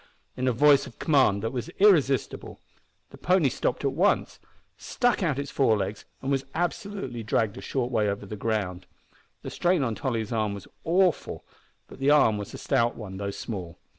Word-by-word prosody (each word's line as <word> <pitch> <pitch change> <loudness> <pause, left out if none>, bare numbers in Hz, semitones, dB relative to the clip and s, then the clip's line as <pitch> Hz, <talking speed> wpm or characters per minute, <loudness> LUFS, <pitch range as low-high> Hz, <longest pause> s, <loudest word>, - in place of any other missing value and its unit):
in 130 0 -2
a - - +4
voice 140 +3 +4
of - - -14
command 130 -10 +3
that 115 - -1
was 125 +5 -4
irresistible. 150 - +2 0.5
The - - -13
pony 180 -6 +3
stopped 125 +2 -2
at 135 - +2
once, 180 +9 +1 0.4
stuck 245 -4 0
out 155 -7 0
its 140 0 -4
fore 115 -6 +3
legs, 100 +1 -4 0.2
and 135 - -1
was 135 -1 +1
absolutely 175 - -3
dragged 110 0 0
a - - -7
short 125 -2 -2
way 105 -4 +1
over 100 +1 -4
the 105 - -6
ground. 100 -4 -2 0.6
The - - -6
strain 175 -4 +1
on 115 -3 -1
Tolly's 115 -2 -3
arm 110 -3 -1
was 100 - -10 0.2
awful, 180 +1 +1 0.4
but - - -13
the 135 +1 +2
arm 115 -8 +4
was 100 - -6
a - - -8
stout 120 0 +1
one, 100 -4 -8
though 100 0 -3
small. 95 -4 -6
125 Hz, 190 wpm, -26 LUFS, 105-150 Hz, 0.6 s, a